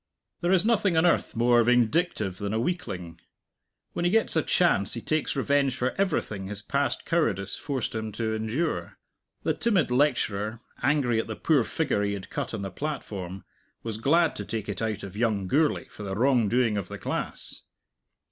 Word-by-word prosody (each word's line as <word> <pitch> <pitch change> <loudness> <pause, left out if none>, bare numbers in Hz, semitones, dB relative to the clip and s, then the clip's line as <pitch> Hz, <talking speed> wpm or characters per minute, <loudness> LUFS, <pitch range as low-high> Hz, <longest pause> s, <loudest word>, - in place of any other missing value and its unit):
There 175 0 0
is 190 +1 +5
nothing 205 -6 +2
on 160 - +4
earth 175 - +2
more 120 +1 +4
vindictive 120 - +1
than 100 +1 -2
a - - +1
weakling. 95 - -4 0.7
When - - -2
he 175 - +3
gets 220 0 +2
a 160 - +4
chance 145 - +3
he 115 - -4
takes 155 +3 -1
revenge 140 -1 +2
for 125 +1 -1
everything 130 - -1
his 105 +1 -4
past 140 +5 -1
cowardice 105 - 0
forced 135 -5 -3
him 110 -1 -3
to 110 0 -2
endure. 110 +9 -2 0.5
The - - +1
timid 200 - +1
lecturer, 115 -5 +1 0.2
angry 130 -6 +2
at 115 - -2
the 110 - -4
poor 145 -1 +2
figure 125 -2 -1
he 100 0 0
had 100 -2 -7
cut - - -3
on 100 - -5
the 95 - -4
platform, 95 -10 -5 0.4
was 110 -2 -3
glad 165 +7 +3
to 105 - -3
take 110 0 -4
it 105 - -4
out 110 -1 -2
of 100 -1 -8
young 105 -3 0
Gourlay 150 +10 +1
for - - -12
the 95 -2 -4
wrongdoing 120 -2 +2
of 100 - -3
the - - -7
class. - - -5
120 Hz, 185 wpm, -27 LUFS, 105-155 Hz, 0.7 s, is